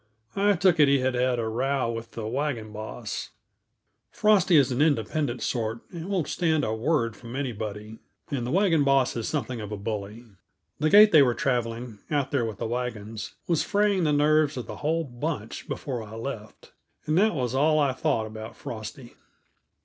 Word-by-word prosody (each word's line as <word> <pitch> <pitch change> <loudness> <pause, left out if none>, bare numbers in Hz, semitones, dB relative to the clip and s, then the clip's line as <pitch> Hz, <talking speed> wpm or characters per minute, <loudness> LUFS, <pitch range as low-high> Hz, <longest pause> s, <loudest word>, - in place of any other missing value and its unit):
I 205 +1 +3
took 180 -2 +3
it 145 - +7
he 140 0 +4
had 130 0 0
had 125 0 +1
a 115 -1 -1
row 130 +2 0
with 115 0 -7
the 115 -2 -5
wagon 120 -2 -2
boss. 110 0 -6 0.8
Frosty 200 -4 +3
is 135 -2 +4
an 125 +3 0
independent 145 -2 0
sort 115 -1 -2
and 170 +1 -7
won't 185 -6 0
stand 160 -4 +1
a 110 - -1
word 115 -1 0
from 120 +1 -9
anybody, 110 -5 -5 0.3
and 135 -4 -1
the 120 - -3
wagon 170 -2 +3
boss 135 -2 +3
is 115 -2 -3
something 125 -5 -3
of 105 0 -7
a 105 - -3
bully. 105 +2 -5 0.5
The 155 +1 +2
gait 210 +4 +8
they 155 - +8
were 125 -3 +3
traveling, 120 -3 -2
out 145 -3 0
there 135 -5 +1
with 110 -3 -5
the 115 - -4
wagons, 115 -2 -4
was 170 -3 +1
fraying 205 -2 +2
the 155 - +2
nerves 150 0 +3
of 125 - -4
the - - -8
whole 160 +3 0
bunch 120 -4 -5
before 125 -4 -4
I 110 0 -9
left. 115 -2 -7 0.3
And 155 - 0
that 215 -2 +3
was 125 -3 -1
all 155 +3 +3
I 140 -3 +2
thought 110 -3 0
about 110 +1 -8
Frosty. 120 +2 -8
130 Hz, 190 wpm, -26 LUFS, 115-155 Hz, 0.8 s, gait